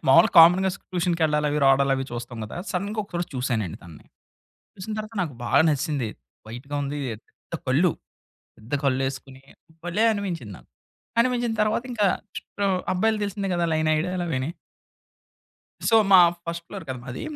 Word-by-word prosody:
మామూలుగా 135 Hz, -, +6 dB
కామన్‌గా 180 Hz, +3 st, +7 dB
స్ -, -, -11 dB
ట్యూషన్‌కి 175 Hz, -2 st, 0 dB
వెళ్ళాలి 150 Hz, -1 st, +1 dB
అవి, 150 Hz, -, 0 dB
రావడాలి 135 Hz, 0 st, +4 dB
అవి 135 Hz, -, -2 dB
చూస్తాం 120 Hz, 0 st, -6 dB
కదా! 110 Hz, -, -8 dB
సడెన్‌గా 200 Hz, +4 st, -3 dB
ఒకసారి 175 Hz, -3 st, -4 dB
చూసానండి 115 Hz, -9 st, -2 dB
తనని. 85 Hz, -3 st, -14 dB, 0.7 s
చూసిన 190 Hz, +3 st, -7 dB
తర్వాత 215 Hz, +1 st, -7 dB
నాకు 155 Hz, -6 st, -3 dB
బాగా -, -, +4 dB
నచ్చేసింది. 145 Hz, -5 st, -1 dB, 0.4 s
వైట్‌గా 125 Hz, +6 st, -7 dB
ఉంది, 145 Hz, +1 st, -4 dB
పెద్ద 110 Hz, +8 st, -11 dB
కళ్ళు 155 Hz, +7 st, +3 dB, 0.7 s
పెద్ద 110 Hz, +6 st, -11 dB
కళ్ళేసుకొని 135 Hz, 0 st, -2 dB, 0.4 s
భలే 205 Hz, +6 st, +1 dB
అనిపించింది 170 Hz, -, -4 dB
నాకు. -, -, -20 dB, 0.5 s
అనిపించిన 240 Hz, -1 st, +1 dB
తర్వాత 220 Hz, +3 st, 0 dB
ఇంకా 210 Hz, -3 st, +2 dB, 0.3 s
చుట్టూ 200 Hz, -, -7 dB
ఆహ్, 185 Hz, -1 st, +1 dB
అబ్బాయిలకి 215 Hz, +3 st, +1 dB
తెలిసిందే 200 Hz, -1 st, -3 dB
కదా! 175 Hz, -1 st, +1 dB
లైన్ 155 Hz, 0 st, +1 dB
ఏయడాలవీని. 165 Hz, -5 st, -2 dB, 1.4 s
సో, 225 Hz, -, +5 dB, 0.2 s
మా 185 Hz, -, +10 dB, 0.3 s
ఫస్ట్ 170 Hz, 0 st, -5 dB
ఫ్లోర్ 195 Hz, -3 st, -8 dB
కదా 130 Hz, -1 st, -4 dB
మాది. 125 Hz, -2 st, -6 dB
165 Hz, 150 wpm, -24 LUFS, 135-190 Hz, 1.4 s, మా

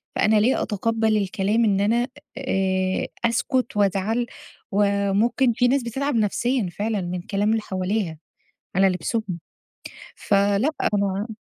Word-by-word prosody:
فأنا 215 Hz, 0 st, +3 dB
ليه 245 Hz, +5 st, +2 dB
أتقَبل 220 Hz, +1 st, 0 dB
الكلام 205 Hz, +3 st, +1 dB
إن 200 Hz, -1 st, +2 dB
أنا 235 Hz, +4 st, +2 dB, 0.3 s
آآ، 190 Hz, -6 st, 0 dB, 0.2 s
أسكت 235 Hz, 0 st, 0 dB
وأزعَل 205 Hz, +4 st, +1 dB, 0.5 s
وممكن 205 Hz, +5 st, +2 dB
في 245 Hz, +1 st, +2 dB
ناس 270 Hz, +1 st, +2 dB
بتتعب 270 Hz, +3 st, -2 dB
نفسيًا 225 Hz, 0 st, 0 dB
فعلًا 210 Hz, +1 st, -2 dB
من 175 Hz, 0 st, -4 dB
كلام 200 Hz, +3 st, -1 dB
اللي 225 Hz, -, +1 dB
حواليها 190 Hz, -4 st, -2 dB, 0.6 s
على 195 Hz, 0 st, +5 dB
لبسهم، 185 Hz, 0 st, -2 dB, 0.8 s
فلأ 200 Hz, +5 st, +2 dB, 0.2 s
أنا 200 Hz, +1 st, 0 dB
210 Hz, 120 wpm, -23 LUFS, 195-230 Hz, 0.8 s, على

